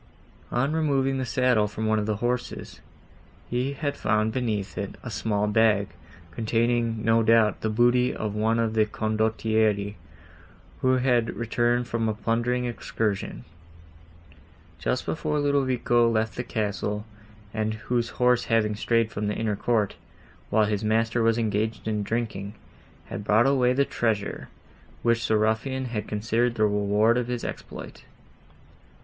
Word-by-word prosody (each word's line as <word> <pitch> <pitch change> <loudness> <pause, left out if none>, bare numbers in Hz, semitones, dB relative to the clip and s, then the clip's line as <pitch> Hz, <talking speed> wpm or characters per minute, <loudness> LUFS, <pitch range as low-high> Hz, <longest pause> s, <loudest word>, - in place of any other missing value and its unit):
On 135 +5 0
removing 135 -4 +1
the 130 - -2
saddle 125 -3 +2
from 110 +1 -4
one 110 0 +2
of 105 - -2
the 105 - 0
horses, 125 0 -3 0.7
he 125 +3 0
had 145 0 -3
found 110 +1 +1
beneath 105 -7 -2
it - - -4
a - - -6
small 105 -2 0
bag, 105 -1 +3 0.4
containing, 115 +2 0
no 115 0 +4
doubt, 110 -1 +3
the 110 - 0
booty 120 +3 +3
of 105 -2 -4
one 110 +2 +1
of 115 -1 0
the 110 -1 +3
Condottieri, 110 -1 0 0.9
who 130 0 +3
had 125 -3 +1
returned 120 +1 +1
from 115 -1 -1
a 110 - -1
plundering 120 +3 0
excursion, 110 - -3 1.3
just 125 - -1
before 155 -1 -1
Ludovico 130 -4 +2
left 110 -1 0
the 125 - -3
castle, 105 -2 -2 0.5
and 110 0 -1
whose 120 +2 -1
horse 125 -1 +3
having 110 -2 +1
strayed 115 +1 +1
from 105 +1 -3
the 105 - -1
inner 110 -2 -1
court, 110 -1 0 0.5
while 110 0 +3
his 105 0 -1
master 115 +2 +1
was 115 0 +3
engaged 110 0 -1
in 105 -1 0
drinking, 105 -2 -3 0.5
had 105 - -6
brought 110 +3 +4
away 130 -2 +3
the 140 +2 +2
treasure, 110 -6 -2 0.5
which 115 -1 +2
the 110 - +3
ruffian 110 +5 0
had 105 -2 -3
considered 115 +3 0
the 110 - +1
reward 105 +3 +2
of 120 - -3
his 125 -1 -3
exploit. - - -7
115 Hz, 145 wpm, -26 LUFS, 110-120 Hz, 1.3 s, no